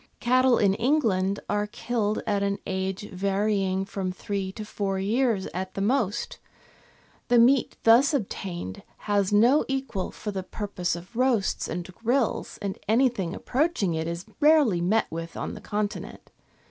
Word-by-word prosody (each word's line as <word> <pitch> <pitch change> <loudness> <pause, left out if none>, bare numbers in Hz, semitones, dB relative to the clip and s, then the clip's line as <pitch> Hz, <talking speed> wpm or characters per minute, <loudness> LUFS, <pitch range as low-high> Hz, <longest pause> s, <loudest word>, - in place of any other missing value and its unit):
Cattle 255 0 +4
in 200 -2 +3
England 205 -6 +1
are 210 0 0
killed 215 -1 -2
at 205 -2 0
an 200 0 0
age 190 +1 -3
varying 195 0 0
from 195 -2 -3
three 190 +1 -4
to 215 - -7
four 200 -2 -2
years 215 +1 +1
at 185 +1 -4
the - - -3
most; 230 +1 0 0.9
the 245 - +4
meat 245 +2 +4
thus 235 +5 +6
obtained 190 - -4 0.2
has 205 -2 +1
no 235 +8 +5
equal 265 -8 -2
for 210 - -6
the 195 -1 -3
purpose 185 -3 -3
of 180 +6 -11
roasts 245 -5 +1
and 180 +1 -5
grills, 240 +4 -1
and 195 -1 -3
anything 220 -6 +2
approaching 260 - 0
it 160 0 -2
is 170 +1 -4
rarely 290 - +4
met 210 +6 +2
with 165 +1 -6
on - - -4
the - - -9
Continent. 210 0 -4
205 Hz, 150 wpm, -26 LUFS, 190-240 Hz, 0.9 s, thus